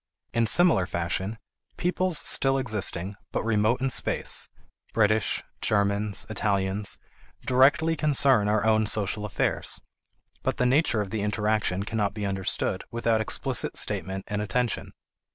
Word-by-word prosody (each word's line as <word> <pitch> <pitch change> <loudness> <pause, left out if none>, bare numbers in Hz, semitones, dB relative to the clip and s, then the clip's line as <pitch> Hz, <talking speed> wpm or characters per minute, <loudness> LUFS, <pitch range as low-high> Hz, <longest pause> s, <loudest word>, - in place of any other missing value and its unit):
In 115 -1 +2
similar 160 - +4
fashion, 90 +5 -3 0.4
peoples 180 -1 0
still 135 0 +3
existing, 105 -6 -1 0.2
but - - -2
remote 110 +2 +1
in 135 0 +1
space, - - -1 0.5
British, 110 -1 +2 0.2
Germans, 100 -1 +2
Italians, 100 -1 -1 0.5
directly 145 +6 +4
concern 135 -8 +3
our 105 +1 +1
own 110 -1 +3
social 105 0 0
affairs, 105 - -1 0.6
but - - -2
the 125 - +1
nature 125 -4 +2
of 100 - -5
the 110 -2 -2
interaction 105 -2 0
cannot 105 -1 -2
be 105 -2 -3
understood 95 -1 -1
without 115 -1 0
explicit 110 - -1
statement 95 0 0
and 105 0 -2
attention. 115 +4 -2
110 Hz, 130 wpm, -26 LUFS, 100-125 Hz, 0.6 s, similar